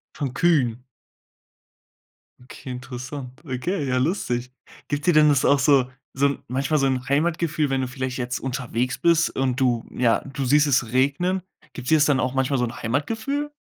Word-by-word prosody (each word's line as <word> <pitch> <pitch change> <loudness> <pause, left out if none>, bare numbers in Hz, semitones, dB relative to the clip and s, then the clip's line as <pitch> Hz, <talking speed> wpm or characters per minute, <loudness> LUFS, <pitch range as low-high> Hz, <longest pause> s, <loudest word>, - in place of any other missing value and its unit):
Von 135 -4 -3
Kühen? 125 -5 +2 1.6
Okay, 130 +1 -11
interessant. 125 +1 -7
Okay, 145 +5 -2
ja 130 -1 +1
lustig. 125 -5 -1 0.4
Gibt 145 +2 -2
dir 175 - +5
denn 155 -1 +6
das 140 -3 +3
auch 140 - +4
so 135 -2 +3 0.2
so 140 +1 +1
manchmal 135 +4 0
so 135 - +2
'n 130 0 -1
Heimatgefühl 155 0 0
wenn 135 -1 0
du 130 - -2
vielleicht 130 -1 -4
jetzt 125 0 -3
unterwegs 125 -1 -2
bist 170 -1 +3
und 130 -1 0
du 120 -3 +1
ja, 120 -2 +2
du 140 -1 -3
siehst 145 +3 +4
es 125 -4 +1
regnen, 150 +8 +1 0.3
gibt 130 -1 -6
dir 160 - +6
das 150 - +5
dann 145 -3 +3
auch 130 0 -1
manchmal 135 +1 +1
so 125 - +1
'n 120 0 -4
Heimatgefühl? 225 - -2
135 Hz, 175 wpm, -23 LUFS, 125-150 Hz, 1.6 s, denn